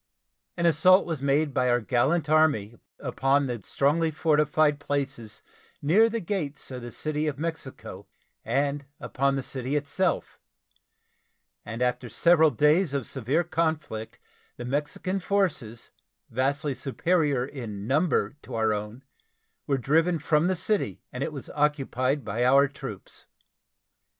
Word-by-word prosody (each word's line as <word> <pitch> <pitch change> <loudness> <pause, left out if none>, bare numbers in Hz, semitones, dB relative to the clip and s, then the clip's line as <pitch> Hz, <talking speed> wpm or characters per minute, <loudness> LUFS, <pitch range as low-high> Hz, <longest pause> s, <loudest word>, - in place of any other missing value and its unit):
An 170 - 0
assault 180 +4 +5
was 160 -5 -4
made 140 +1 +1
by 125 -1 +2
our 120 0 +3
gallant 130 +8 +1
Army 150 -9 +3 0.2
upon 140 +1 +1
the 120 -4 -4
strongly 155 - +1
fortified 150 -1 +2
places 135 -6 -4 0.4
near 200 +11 +4
the 230 +1 -2
gates 165 -9 -4
of 125 -1 -6
the 120 0 -8
City 155 +3 -2
of 145 -2 -2
Mexico 160 -3 -6 0.4
and 140 +4 -1
upon 140 +1 0
the 135 - -2
city 130 +2 -4
itself, 150 +6 -1 1.2
and 115 +3 -4
after 125 0 -1
several 160 +4 +4
days 150 +2 +2
of 135 -4 -1
severe 145 +10 -1
conflict 155 -10 -2 0.4
the 120 - -6
Mexican 145 +8 -2
forces, 165 - -1 0.4
vastly 140 +4 0
superior 145 -1 0
in 115 -8 -7
number 140 - +1
to 125 - -8
our 110 -1 +2
own, 105 +5 -6 0.6
were 140 - +2
driven 165 +7 +2
from 155 +2 +2
the 185 - +1
city, 170 - -1
and 125 +2 -3
it - - -3
was 140 -3 -8
occupied 140 -2 0
by 115 +4 -1
our 135 +3 +5
troops. 135 -7 -10
140 Hz, 135 wpm, -26 LUFS, 125-155 Hz, 1.2 s, assault